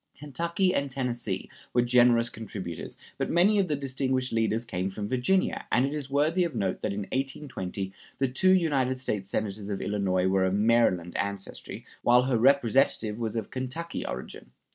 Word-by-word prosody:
Kentucky 170 Hz, +6 st, -1 dB
and 140 Hz, -5 st, 0 dB
Tennessee 120 Hz, -7 st, -3 dB, 0.3 s
were 120 Hz, -, +5 dB
generous 120 Hz, -1 st, +4 dB
contributors, 100 Hz, -6 st, -6 dB, 0.2 s
but -, -, -1 dB
many 200 Hz, +5 st, +4 dB
of 190 Hz, -, +2 dB
the 150 Hz, -, 0 dB
distinguished 130 Hz, -2 st, -1 dB
leaders 115 Hz, +1 st, +1 dB
came 95 Hz, -3 st, -2 dB
from 100 Hz, +1 st, -5 dB
Virginia, 130 Hz, -, 0 dB
and 125 Hz, -, +4 dB
it 140 Hz, -, -3 dB
is 145 Hz, -3 st, -4 dB
worthy 155 Hz, +6 st, +2 dB
of 165 Hz, -6 st, -3 dB
note 95 Hz, -4 st, -1 dB
that -, -, -1 dB
in 100 Hz, +1 st, -3 dB
1820 130 Hz, -8 st, -3 dB, 0.2 s
the 135 Hz, -, +1 dB
two 135 Hz, +9 st, +2 dB
United 140 Hz, -8 st, +2 dB
States 100 Hz, -6 st, -2 dB
Senators 105 Hz, -1 st, -3 dB
of 100 Hz, -, -2 dB
Illinois 95 Hz, -3 st, 0 dB
were 95 Hz, 0 st, +2 dB
of 95 Hz, +1 st, +1 dB
Maryland 105 Hz, -6 st, +2 dB
ancestry, 100 Hz, -1 st, -4 dB, 0.2 s
while 125 Hz, +1 st, +5 dB
her 125 Hz, -3 st, +1 dB
Representative 120 Hz, -4 st, +3 dB
was 115 Hz, -1 st, -2 dB
of 110 Hz, -3 st, -3 dB
Kentucky 135 Hz, +6 st, -4 dB
origin. 60 Hz, 0 st, -7 dB
120 Hz, 170 wpm, -28 LUFS, 100-140 Hz, 0.3 s, were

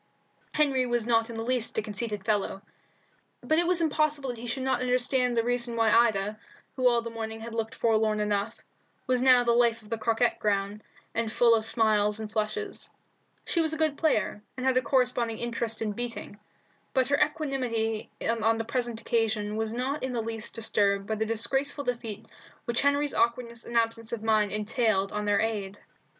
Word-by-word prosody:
Henry 275 Hz, -4 st, +2 dB
was 240 Hz, -2 st, 0 dB
not 230 Hz, -1 st, +2 dB
in 230 Hz, -, -7 dB
the 225 Hz, -, -3 dB
least 245 Hz, -1 st, 0 dB
a -, -, +3 dB
conceited 210 Hz, -1 st, -4 dB
fellow, 205 Hz, -2 st, 0 dB, 0.8 s
but 315 Hz, +1 st, +2 dB
it 345 Hz, -, +1 dB
was 355 Hz, -1 st, +4 dB
impossible 305 Hz, -3 st, +1 dB
that 240 Hz, -, -9 dB
he 240 Hz, -, -7 dB
should 260 Hz, +2 st, -2 dB
not 260 Hz, -2 st, 0 dB
understand 250 Hz, 0 st, +1 dB
the 230 Hz, -, +3 dB
reason 240 Hz, 0 st, 0 dB
why 225 Hz, -1 st, +3 dB
Ida, 215 Hz, -2 st, +2 dB, 0.4 s
who 255 Hz, -1 st, +3 dB
all 235 Hz, -1 st, +1 dB
the 230 Hz, -, -6 dB
morning 225 Hz, -1 st, -5 dB
had 230 Hz, 0 st, -7 dB
looked 225 Hz, -1 st, -3 dB
forlorn 220 Hz, -2 st, +2 dB
enough, 210 Hz, +1 st, -1 dB, 0.4 s
was 255 Hz, -1 st, +1 dB
now 255 Hz, -1 st, +6 dB
the 235 Hz, -, +2 dB
life 235 Hz, -1 st, +3 dB
of 210 Hz, -, -17 dB
the 230 Hz, -, -2 dB
croquet 230 Hz, +2 st, +1 dB
ground, 205 Hz, 0 st, -1 dB, 0.3 s
and 225 Hz, -1 st, -1 dB
full 235 Hz, 0 st, +4 dB
of 220 Hz, -1 st, +2 dB
smiles 215 Hz, -2 st, +2 dB
and 215 Hz, -1 st, -6 dB
flushes. 230 Hz, -, -3 dB, 0.6 s
She 335 Hz, -, +1 dB
was 320 Hz, -1 st, 0 dB
a -, -, -2 dB
good 310 Hz, -2 st, +1 dB
player, 285 Hz, -9 st, 0 dB, 0.2 s
and 255 Hz, -, -4 dB
had 260 Hz, -1 st, +3 dB
a 255 Hz, -, +4 dB
corresponding 245 Hz, -3 st, +1 dB
interest 235 Hz, -1 st, -2 dB
in 215 Hz, -, -1 dB
beating, 230 Hz, -2 st, -6 dB, 0.6 s
but 260 Hz, 0 st, +2 dB
her 285 Hz, -, +2 dB
equanimity 250 Hz, -8 st, -2 dB, 0.2 s
on 225 Hz, 0 st, +2 dB
the 225 Hz, -, -2 dB
present 235 Hz, -1 st, -2 dB
occasion 220 Hz, -2 st, 0 dB
was 220 Hz, 0 st, -1 dB
not 260 Hz, +5 st, -2 dB
in 260 Hz, -1 st, -3 dB
the 235 Hz, -, -1 dB
least 225 Hz, 0 st, -4 dB
disturbed 200 Hz, -3 st, +1 dB
by 220 Hz, -, -2 dB
the 220 Hz, 0 st, -1 dB
disgraceful 270 Hz, +6 st, -1 dB
defeat 230 Hz, -4 st, -4 dB, 0.4 s
which 235 Hz, 0 st, +1 dB
Henry's 285 Hz, 0 st, +2 dB
awkwardness 235 Hz, 0 st, -1 dB
and 235 Hz, -, -2 dB
absence 230 Hz, -1 st, 0 dB
of 230 Hz, -2 st, -4 dB
mind 215 Hz, -2 st, +2 dB
entailed 210 Hz, -2 st, 0 dB
on 210 Hz, 0 st, -2 dB
their 205 Hz, -1 st, +2 dB
aide. 205 Hz, -3 st, -2 dB
230 Hz, 190 wpm, -28 LUFS, 220-250 Hz, 0.8 s, now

